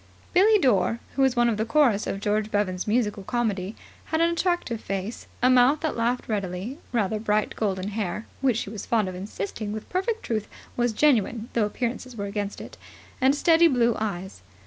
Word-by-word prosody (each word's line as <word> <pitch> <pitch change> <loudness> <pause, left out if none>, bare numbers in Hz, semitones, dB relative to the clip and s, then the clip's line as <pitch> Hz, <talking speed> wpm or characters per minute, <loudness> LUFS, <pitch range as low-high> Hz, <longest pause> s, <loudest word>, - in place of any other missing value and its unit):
Billie 415 +4 +6
Dore, 235 - +2 0.2
who 275 - +1
was 265 -1 +3
one 240 0 +4
of 225 -3 +1
the 215 - +1
chorus 230 -4 +2
of 195 - -2
George 210 +1 0
Bevan's 195 -3 -1
musical 210 -2 +1
comedy, 205 -2 -2 0.3
had 320 - -1
an 335 +1 +3
attractive 340 - -1
face, 195 +3 -4 0.2
a 255 - +6
mouth 255 +4 +5
that 315 -2 -1
laughed 240 +2 0
readily, 200 - -3
rather 215 -3 0
bright 210 -1 0
golden 195 -2 -1
hair 210 0 -3 0.2
(which, 255 -5 +2
she 210 - -4
was 210 -3 -6
fond 220 -4 +1
of 185 - -4
insisting 200 +2 -5
with 215 0 -6
perfect 435 +5 -1
truth, 215 -3 -2 0.3
was 240 -1 +1
genuine 230 -2 +2
though 225 -3 +2
appearances 245 +3 -4
were 200 -2 -4
against 200 0 -4
it), - - -10 0.4
and 265 +2 +4
steady 330 +2 +5
blue 240 -5 +2
eyes. 190 - -4
225 Hz, 190 wpm, -25 LUFS, 205-255 Hz, 0.4 s, Billie